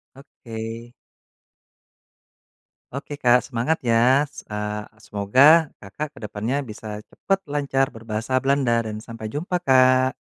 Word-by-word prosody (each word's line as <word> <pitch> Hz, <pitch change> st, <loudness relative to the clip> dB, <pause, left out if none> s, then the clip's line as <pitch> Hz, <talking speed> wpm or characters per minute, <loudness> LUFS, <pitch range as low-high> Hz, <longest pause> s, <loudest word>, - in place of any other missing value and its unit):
Oke. 115 Hz, -3 st, -9 dB, 2.0 s
Oke 140 Hz, +2 st, -6 dB
Kak 125 Hz, -2 st, +4 dB
semangat 125 Hz, +6 st, -1 dB
ya. 125 Hz, +4 st, +4 dB
Se -, -, -12 dB
eee, 105 Hz, 0 st, -4 dB, 0.2 s
semoga 100 Hz, +5 st, 0 dB, 0.4 s
Kakak 105 Hz, +10 st, -6 dB
ke -, -, -12 dB
depannya 105 Hz, +5 st, -3 dB
bisa 105 Hz, -2 st, -8 dB
cepat 195 Hz, -, -2 dB
lancar 140 Hz, -3 st, -1 dB
berbahasa 115 Hz, +3 st, -2 dB
Belanda 135 Hz, -3 st, +2 dB
dan 105 Hz, 0 st, -6 dB
sampai 115 Hz, -2 st, -8 dB
jumpa, 170 Hz, -, -3 dB
Kak. 130 Hz, -4 st, +4 dB
120 Hz, 115 wpm, -23 LUFS, 110-135 Hz, 2.0 s, Kak